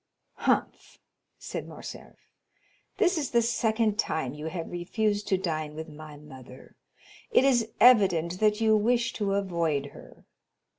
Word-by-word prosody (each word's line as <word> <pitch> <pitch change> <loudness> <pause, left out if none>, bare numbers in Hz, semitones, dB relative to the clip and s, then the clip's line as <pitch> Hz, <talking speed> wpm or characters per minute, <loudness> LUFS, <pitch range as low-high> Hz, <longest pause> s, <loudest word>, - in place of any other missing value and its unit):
"Humph," - - -1 0.4
said - - -6
Morcerf, - - -10 0.8
"this 360 -4 +2
is 285 - -2
the 235 -1 +2
second 220 -2 0
time 145 - -1
you 150 +1 -6
have 165 0 -5
refused 205 +4 -1
to 190 - +2
dine 155 -5 -3
with 160 +1 -7
my 155 -1 -11
mother; 130 -3 -14 0.5
it 435 - +4
is 240 -5 +2
evident 185 -8 +4
that 210 0 +2
you 220 -1 +4
wish 235 +2 +1
to 200 -2 -1
avoid 170 -7 -1
her." - - -15
195 Hz, 140 wpm, -27 LUFS, 160-225 Hz, 0.8 s, it